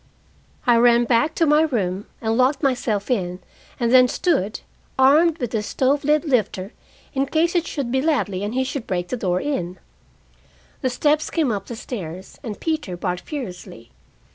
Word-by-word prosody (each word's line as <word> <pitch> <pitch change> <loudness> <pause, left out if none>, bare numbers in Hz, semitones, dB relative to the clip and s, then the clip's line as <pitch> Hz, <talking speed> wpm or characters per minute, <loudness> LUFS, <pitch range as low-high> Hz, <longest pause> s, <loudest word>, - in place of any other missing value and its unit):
I 240 -2 +5
ran 240 0 +5
back 240 +7 +2
to 330 - +3
my 300 0 +4
room 205 - -1
and 225 -1 0
locked 265 +4 +2
myself 240 -6 0
in, 180 -6 -1 0.4
and 235 0 +1
then 255 -1 +7
stood, 215 - 0 0.4
armed 300 +5 +5
with 245 -6 -3
the 220 - 0
stove 270 +6 0
lid 300 +2 +2
lifter, 215 -7 0 0.4
in 275 0 0
case 330 +4 +1
it 345 -2 +1
should 270 -5 -3
be 265 +1 +1
Ladley 235 - 0
and 210 +4 -3
he 260 - +2
should 270 -2 -5
break 180 -1 -2
the - - -1
door 180 -6 0
in. 185 -11 -3 1.0
The 260 - +1
steps 295 +4 +1
came 310 -7 +1
up 200 -2 -4
the 235 - -6
stairs, 190 -6 -7
and 220 -6 -6
Peter 310 - -2
barked 180 -1 -2
furiously. 180 - -8
245 Hz, 175 wpm, -22 LUFS, 200-290 Hz, 1.0 s, then